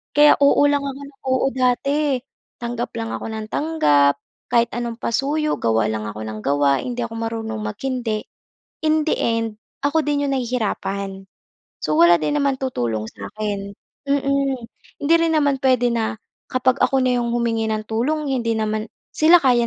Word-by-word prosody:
kaya, 295 0 +7
oo 280 - +5
lang 285 -1 +1
ako - - -2 0.2
ng - - -14 0.2
oo 260 0 +2
dati. 270 +2 +1 0.4
Tanggap 240 0 -3
lang 225 0 -3
ako - - -6
ng 220 -1 -5
tanggap, 145 - +2 0.3
kahit 235 -1 +4
anong 240 -1 -2
pasuyo 295 +6 0
gawa 110 -1 +1
lang 110 -1 -2
ako 105 0 -6
ng 110 0 -6
gawa, 140 0 +3
hindi 245 -1 -4
ako 230 -1 -4
marunong 225 -1 -3
maghindi. 220 0 -2 0.6
In 310 0 +2
the - - +2
end, 225 -2 -1 0.2
ako 300 +3 +3
din 290 -1 0
'yong 275 - -1
nahihirapan. 200 -6 -2 0.6
So, 155 +1 +1
wala 170 0 +7
din 290 - +1
naman 280 -1 +2
tutulong 120 - -2
sa'kin, 200 -2 -5 0.3
mm. 275 -1 +1 0.5
Hindi 320 +4 +5
rin 330 -1 +2
naman 285 -3 +2
puwede 250 -2 +3
na 225 -1 -1 0.3
kapag 255 +1 +1
ako 270 -1 +3
na 250 -1 +2
'yong 235 - -1
humingi 230 -2 0
ng 215 0 -1
tulong 280 +7 -1
hindi 230 -3 0
naman 215 0 -1 0.3
sila 325 +3 +6
kaya 245 -3 +4
240 Hz, 165 wpm, -21 LUFS, 215-275 Hz, 0.6 s, kaya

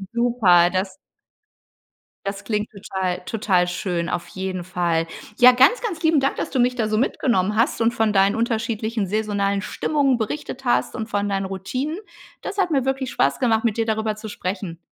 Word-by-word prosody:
Super, 220 -8 +4
das 190 +1 -2 1.3
das 200 0 -4
klingt 210 0 -2
total 190 -3 -3
total 190 -5 +1
schön. 175 -1 -2
Auf 175 -1 -3
jeden 190 -1 -4
Fall. 170 -2 0 0.3
Ja, 250 0 +9
ganz, 265 - +5
ganz 395 -10 -4
lieben 320 -2 +3
Dank, 275 +1 0
dass - - -3
du 265 - -1
mich 250 +1 +3
da 220 -3 0
so 215 - +1
mitgenommen 215 -5 +1
hast 230 +1 +1
und 230 +1 +3
von 225 -2 +1
deinen 195 0 +3
unterschiedlichen 225 -2 -1
saisonalen 200 -1 0
Stimmungen 275 +1 0
berichtet 260 +3 -5
hast 245 - +1
und 220 -2 -4
von 205 -2 -1
deinen 195 -1 -1
Routinen. 255 - -4 0.4
Das 405 - -6
hat 370 -4 +1
mir 275 -4 +2
wirklich 265 -1 -2
Spaß 140 -10 +1
gemacht, 225 -3 +2
mit 230 -2 0
dir 225 - +1
darüber 220 -1 -1
zu 215 +1 -8
sprechen. 185 -4 -5
215 Hz, 180 wpm, -22 LUFS, 190-245 Hz, 1.3 s, Ja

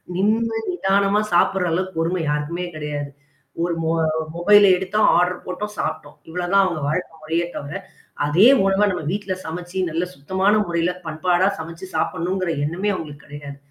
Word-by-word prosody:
நின்னு, 225 +4 +1
நிதானமா 200 - +2
சாப்படுற 180 +1 +3
அளவுக்கு 185 +1 -2
பொறுமை 170 +2 0
யாருக்குமே 150 +4 -2
கிடையாது. 150 -2 -4 0.5
ஒரு 175 - 0
மொ 160 - +1 0.4
மொபைல 205 +4 +6
எடுத்தோம் 190 +4 +1
ஆர்டர் 180 +1 +1
போட்டோம், 205 +3 -5
சாப்ட்டோம். 155 -2 -4
இவ்ளோதான் 180 +3 +2
அவவுங்க 170 -5 -1
வாழ்க்க 180 +4 -2
முறையே 165 +2 -1
தவர. 145 +2 -6 0.5
அதே 170 +10 +5 0.2
உணவ 195 +2 +3
நம்ம 180 -4 -3
வீட்ல 200 -1 -2
சமைச்சு 175 +3 -5
நல்ல 165 +2 -1
சுத்தமான 190 +8 +1
முறையில 170 +1 0 0.2
பண்பாடா 175 +4 +1
சமைச்சு 165 +3 -7
சாப்பிடணுங்கிற 180 +1 -1
எண்ணமே 185 +7 -1
அங்களுக்கு 150 -3 -8
கிடையாது. 145 -1 -9
180 Hz, 145 wpm, -22 LUFS, 160-195 Hz, 0.5 s, மொபைல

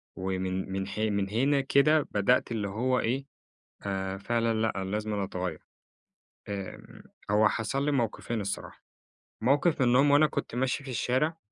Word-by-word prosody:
ومن 95 0 -2
من 95 0 -2
حي 110 +2 -1
من 100 -1 -1
هنا 135 +6 +2
كده 145 +2 +3
بدأت 105 +5 +2
اللي 105 -3 -1
هو 125 +5 +1
إيه 135 +4 -1 0.6
آآ، 95 -1 -3
فعلًا 115 +2 0
لأ 110 - +1
أنا 95 - -4
لازمًا 105 -1 -1
أَتَغَيَّر. 90 -3 -4 0.9
آمم، 100 -2 -7 0.3
هو 105 0 +5
حصل 135 +6 -1
لي 150 - +2
موقِفين 115 -3 -1
الصراحة. 100 0 -5 0.6
موقِف 145 +5 +2
منهم 130 +3 +5
وأنا 150 +2 +6
كنت 120 - -4
ماشي 130 +2 0
في 135 - -9
الشارع 130 +7 0
115 Hz, 150 wpm, -29 LUFS, 100-135 Hz, 0.9 s, وأنا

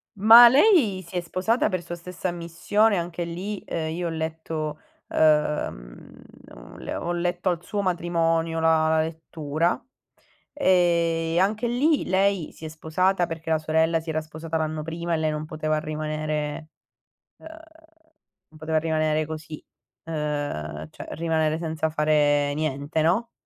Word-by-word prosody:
Ma 225 +4 +9
lei 260 - +4
si 180 - -11
è 175 - 0
sposata 185 +8 0
per 185 -2 -3
sua 175 0 -6
stessa 180 +1 -5
ammissione. 175 +5 +1
Anche 175 0 -3
lì, 185 +5 -5
ehm, 160 -1 -3
io 175 -1 -2
ho - - -2
letto 160 -1 -4 0.3
ehm, 150 - 0 0.3
le - - -14
ho - - -13
le - - -6
ho - - -5
ho 175 - -1
letto 175 +1 -1
al 175 -1 -2
suo 205 0 -2
matrimonio 165 -2 0
la 160 -1 +3
la 160 0 +3
lettura; 160 0 -2 0.7
e 170 - +2
anche 215 +5 +1
lì 285 +6 +2
lei 190 -2 +1
si 160 - -11
è - - -3
sposata 175 +3 0
perché 165 -1 -5
la 160 - +3
sorella 160 +1 +1
si 160 0 -9
era 155 0 -1
sposata 160 +1 -5
l'anno 155 -1 -2
prima 170 +1 -4
e - - +2
lei 155 0 0
non 155 0 -4
poteva 155 0 -2
rimanere 155 0 -3 0.7
ehm, - - -13 1.0
non 155 0 -17
poteva 160 0 -1
rimanere 155 -1 0
così, 155 0 -8 0.4
ehm, 145 - -4
cioè - - -10
rimanere 160 -1 0
senza 160 -1 -2
fare 145 -2 +2
niente, 150 +1 -2
no, 210 +9 +1
160 Hz, 155 wpm, -25 LUFS, 155-175 Hz, 1.0 s, Ma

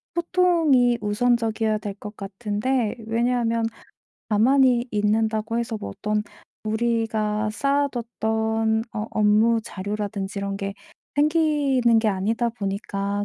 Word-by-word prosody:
소통이 330 -9 +3
우선적이어야 220 0 +1
될 205 -2 -5
것 210 0 -8
같은데 210 +4 -2
왜냐하면 230 0 +1 0.6
가만히 245 +3 +4
있는다고 220 +2 0
해서 230 -1 -2
뭐 100 - -6
어떤 210 - -1 0.4
우리가 220 -1 0
쌓아뒀던 225 -5 0
어 215 +1 -3
업무 215 +2 +3
자료라든지 200 -1 -4
이런 200 0 -3
게 195 0 -4 0.4
생기는 290 -6 +3
게 220 -1 +2
아니다 215 +5 0
보니까 200 -1 -3
220 Hz, 265 characters per minute, -24 LUFS, 210-240 Hz, 0.6 s, 가만히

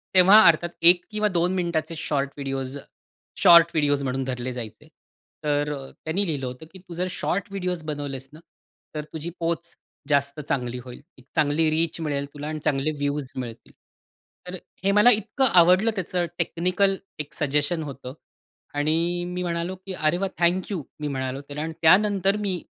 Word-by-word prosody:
तेव्हा 190 +4 +8
अर्थात 170 +1 +4
1 175 +1 +7
किंवा 215 0 +1
2 180 -1 +1
मिनिटाचे 170 -2 -1
शॉर्ट 140 -3 -1
व्हिडिओज, 135 0 -4 0.7
शॉर्ट 170 -1 +9
व्हिडिओज 145 -2 +1
म्हणून 130 0 -1
धरले 125 -1 -4
जायचे. 120 +4 -8 0.6
तर 145 0 0
अ, 135 -2 -8
त्यांनी 185 +6 0
लिहिलं 145 -4 -2
होतं 125 +5 -7
की 190 - -12
"तू 180 -1 -12
जर 180 +2 -2
शॉर्ट 195 +2 -2
व्हिडिओज 180 -4 -3
बनवलेस 145 -3 -5
ना 155 - -12 0.6
तर 150 - -3
तुझी 160 +1 -4
पोच 170 0 -3 0.3
जास्त 140 +1 +1
चांगली 125 -2 -1
होईल, 125 +1 -11 0.3
चांगली 155 +1 +2
रीच 160 +1 0
मिळेल 145 -3 -2
तुला 145 0 -6
आणि 155 0 -4
चांगले 140 +2 +1
व्ह्यूज 145 -1 -2
मिळतील." 120 -3 -7 0.7
तर 180 - -5 0.3
हे 195 - +3
मला 210 +4 +6
इतकं 220 +5 0
आवडलं 185 +6 +5
त्याचं 180 -1 -1
टेक्निकल 185 +3 +1 0.2
एक 150 - -6
सजेशन 145 +3 0
होतं 135 -2 -8 0.6
आणि 165 +4 0
मी 180 0 -4
म्हणालो, 170 +1 -2
की 190 +1 -8
"अरे, 155 0 +1
वाह! 195 +1 -1
Thank 175 +3 +1
you." 180 - -2 0.2
मी 150 - -3
म्हणालो 130 -1 -3
त्याला 145 +1 -7
आणि 160 - -4
त्यानंतर 195 +3 +4
मी 185 -3 -1
160 Hz, 165 wpm, -24 LUFS, 140-180 Hz, 0.7 s, शॉर्ट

